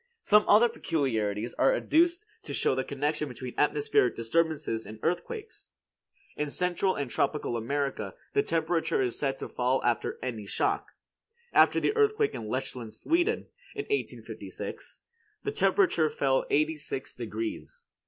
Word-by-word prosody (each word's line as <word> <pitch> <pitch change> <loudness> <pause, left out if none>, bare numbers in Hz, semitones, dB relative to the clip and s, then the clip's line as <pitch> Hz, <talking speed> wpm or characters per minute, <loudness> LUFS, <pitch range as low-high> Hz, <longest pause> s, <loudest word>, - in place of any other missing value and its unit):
Some 210 0 +5
other 220 +4 +7
peculiarities 115 - -1
are - - +5
adduced 345 -1 +2 0.2
to - - -5
show - - +2
the 130 0 0
connection 150 +3 -1
between 125 0 -7
atmospheric 145 -4 +2
disturbances 145 -1 0
and 110 - -8
earthquakes. 435 - -3 0.7
In 150 0 -2
Central 180 +4 0
and 140 -4 -3
Tropical 140 -1 0
America 120 -3 -2 0.2
the - - +4
temperature 165 -3 0
is 125 -2 -2
said 135 -2 0
to - - -5
fall 125 +1 +1
after 120 -1 0
any 115 -5 -4
shock. - - 0 0.7
After - - +6
the 425 - +1
earthquake 430 0 +3
at - - -5
Lechsand, 120 0 -4
Sweden, 350 +8 +1 0.3
in 420 - -2
1856, 420 -1 -5 0.4
the 420 - -1
temperature 370 - +3
fell 135 -2 +1
eighty 155 +2 +2
six 145 -3 -5
degrees. 115 -2 -5
145 Hz, 140 wpm, -29 LUFS, 125-205 Hz, 0.7 s, other